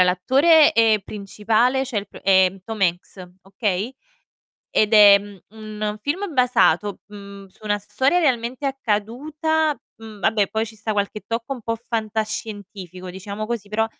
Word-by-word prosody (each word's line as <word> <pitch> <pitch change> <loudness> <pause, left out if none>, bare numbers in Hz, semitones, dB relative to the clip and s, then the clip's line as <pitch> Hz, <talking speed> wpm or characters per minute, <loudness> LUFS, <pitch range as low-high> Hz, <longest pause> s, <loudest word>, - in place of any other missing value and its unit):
Allora - - +7
l'attore, 280 - +4
ehm, 225 -5 +3
principale 220 +6 0
cioè, 245 -4 -5
il 200 - -7
pr - - -13
è 190 -1 +4
Tom 220 -2 -6
Hanks, 180 +1 -2
okay, 200 +3 -3 0.8
ed 215 +1 +1
è, 205 -2 +9
mhmm, 200 -1 -12 0.4
un 210 0 -2
film 345 - -3
basato, 210 -6 +2
mhmm, 200 -1 -11
su 185 - -18
una 205 -1 0
storia 265 - +1
realmente 255 -2 0
accaduta, 285 +6 -1 0.2
mhmm, 220 -2 -12
vabbè 215 -2 +1
poi 220 +1 -2
ci 220 0 -12
sta 220 0 -3
qualche 205 0 -2
tocco 230 +4 -3
un 245 - -11
po' 230 +1 -2
fantascientifico 215 -5 -5
diciamo 200 +3 -6
così, 220 -3 -4
però 220 +1 +1
215 Hz, 155 wpm, -22 LUFS, 200-245 Hz, 0.8 s, è